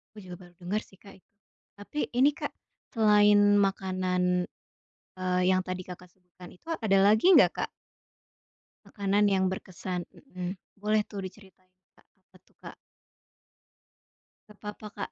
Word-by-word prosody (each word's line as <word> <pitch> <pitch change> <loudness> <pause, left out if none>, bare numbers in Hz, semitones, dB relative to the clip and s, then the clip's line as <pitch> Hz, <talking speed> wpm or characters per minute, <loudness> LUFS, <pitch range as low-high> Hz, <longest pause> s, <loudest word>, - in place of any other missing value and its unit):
Aku 210 - -11
juga 180 -1 -9
baru 175 - -24
denger 195 +5 -2
sih, 190 - -21
Kak. 195 -1 -16 0.6
Tapi, 290 +9 -6 0.2
ini 275 +3 +5
Kak, - - -4 0.5
selain 205 -1 +5
makanan, 185 -2 0 0.7
eee, 185 0 0
yang 185 0 +3
tadi 185 0 -4
Kakak 180 0 -11
sebutkan 180 0 -16
itu, 255 - -21
ada 195 -4 +2
lagi 215 - +4
nggak, - - +7
Kak? - - -3 1.2
Makanan 200 0 0
yang 190 -1 +2
berkesan, 185 -1 -5
mhm. 185 -7 -7 0.2
Boleh 210 +1 +1
tuh 205 -1 -10
diceritain, 185 -2 -16 0.3
Kak, - - -26
apa - - -28
tuh, - - -31
Kak? - - -10 1.7
Nggak 210 - -18
apa-apa, 210 +1 -7
Kak. 200 - -5
195 Hz, 140 wpm, -28 LUFS, 185-210 Hz, 1.7 s, nggak